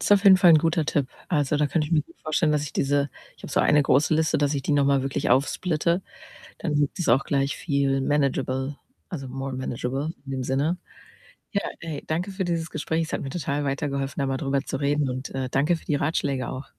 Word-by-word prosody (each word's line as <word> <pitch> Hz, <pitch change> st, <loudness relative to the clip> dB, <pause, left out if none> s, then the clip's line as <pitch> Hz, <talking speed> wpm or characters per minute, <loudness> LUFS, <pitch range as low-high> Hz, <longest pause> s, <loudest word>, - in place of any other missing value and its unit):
Ist -, -, +3 dB
auf 200 Hz, 0 st, +4 dB
jeden 190 Hz, -1 st, +9 dB
Fall 180 Hz, -1 st, +6 dB
'n 160 Hz, -, +8 dB
guter 165 Hz, 0 st, +1 dB
Tipp. 145 Hz, -3 st, 0 dB, 0.2 s
Also, 150 Hz, -3 st, +1 dB
da 150 Hz, 0 st, +2 dB
könnte 155 Hz, +1 st, 0 dB
ich 170 Hz, -, -6 dB
mir 155 Hz, -2 st, +4 dB
gut -, -, -21 dB
vorstellen, 155 Hz, 0 st, +1 dB
dass 150 Hz, -1 st, +1 dB
ich 140 Hz, -, -7 dB
diese 140 Hz, +1 st, +1 dB, 0.3 s
ich -, -, -20 dB
habe -, -, -7 dB
so -, -, +3 dB
eine 150 Hz, -1 st, +4 dB
große 140 Hz, +4 st, +3 dB
Liste, 155 Hz, -1 st, +2 dB
dass 145 Hz, 0 st, +1 dB
ich 135 Hz, -, -2 dB
die 150 Hz, -, 0 dB
noch 140 Hz, -1 st, +3 dB
mal 140 Hz, -1 st, +3 dB
wirklich 135 Hz, -2 st, -1 dB
aufsplitte. 170 Hz, +6 st, +1 dB, 0.6 s
Dann 150 Hz, -, -2 dB
gibt 145 Hz, -1 st, +1 dB
es 175 Hz, -, -1 dB
auch 135 Hz, -, +4 dB
gleich 140 Hz, 0 st, 0 dB
viel 140 Hz, -3 st, 0 dB
managable 135 Hz, -1 st, 0 dB, 0.4 s
also, 135 Hz, -6 st, -5 dB
more 135 Hz, +1 st, -5 dB
managable 130 Hz, +4 st, -3 dB
in 135 Hz, -, -6 dB
dem 130 Hz, -1 st, -2 dB
Sinne. 140 Hz, +7 st, 0 dB, 0.8 s
Ja, 200 Hz, -, +1 dB, 0.2 s
ey, 160 Hz, -4 st, -5 dB
danke 175 Hz, +5 st, -2 dB
für 190 Hz, -1 st, -3 dB
dieses 165 Hz, -2 st, -2 dB
Gespräch. 160 Hz, +2 st, -1 dB
Es -, -, -9 dB
hat -, -, -1 dB
mir 135 Hz, -, -4 dB
total 145 Hz, -3 st, -2 dB
weitergeholfen, 140 Hz, -1 st, -2 dB
da 135 Hz, -, +1 dB
mal 135 Hz, 0 st, -1 dB
drüber 135 Hz, -1 st, 0 dB
zu 135 Hz, -, -3 dB
reden 145 Hz, -1 st, +1 dB
und, 130 Hz, +1 st, -5 dB
äh, 130 Hz, -1 st, -2 dB
danke 150 Hz, +6 st, +2 dB
für -, -, -13 dB
die 145 Hz, -, 0 dB
Ratschläge 140 Hz, -4 st, -1 dB
auch. 130 Hz, -, -5 dB
145 Hz, 235 wpm, -25 LUFS, 135-160 Hz, 0.8 s, jeden